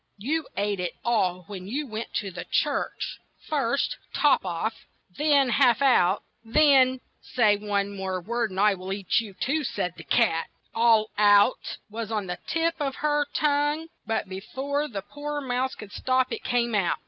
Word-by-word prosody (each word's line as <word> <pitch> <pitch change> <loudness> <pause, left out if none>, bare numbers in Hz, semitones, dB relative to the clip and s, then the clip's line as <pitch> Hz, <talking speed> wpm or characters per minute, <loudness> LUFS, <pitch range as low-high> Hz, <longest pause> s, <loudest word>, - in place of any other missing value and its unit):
You 295 +9 -2
ate 205 -1 0
it 180 -1 -2
all 185 -6 +1
when 185 0 -8
you 280 +8 -2
went 220 -2 -6
to 200 -3 -2
the 180 0 -6
church; - - -1 0.3
first 280 -3 0 0.2
Top 295 -2 +4
off, 185 +5 -2 0.4
then 290 -3 +3
Half 245 -1 +4
out, 210 -9 +3 0.2
then 260 0 +4
— - - -43
" - - -45
"Say 215 -5 +5
one 200 -1 -2
word 185 -2 -3
more 235 0 0
and 190 -3 -5
I 210 0 +5
will 185 0 -7
eat 195 -1 +1
you 205 -4 -10
too," 300 +9 -1
said 180 -9 -2
the - - -9
cat. 165 -9 +1 0.2
"All 225 -2 +3
out'' 205 +3 +4
was 220 +1 -6
on 210 -3 -1
the 180 0 -5
tip 330 0 +1
of 275 -2 -2
her 295 -1 +2
tongue, 295 +2 +1 0.2
and 225 -2 -1
be 190 0 -6
fore 280 +7 -3
the 200 -8 -6
poor 295 +3 -5
mouse 260 -1 -2
could 205 -2 -10
stop, 255 +2 0
it - - -4
came 240 -1 0
out. 195 -5 +1
230 Hz, 185 wpm, -26 LUFS, 200-275 Hz, 0.4 s, Say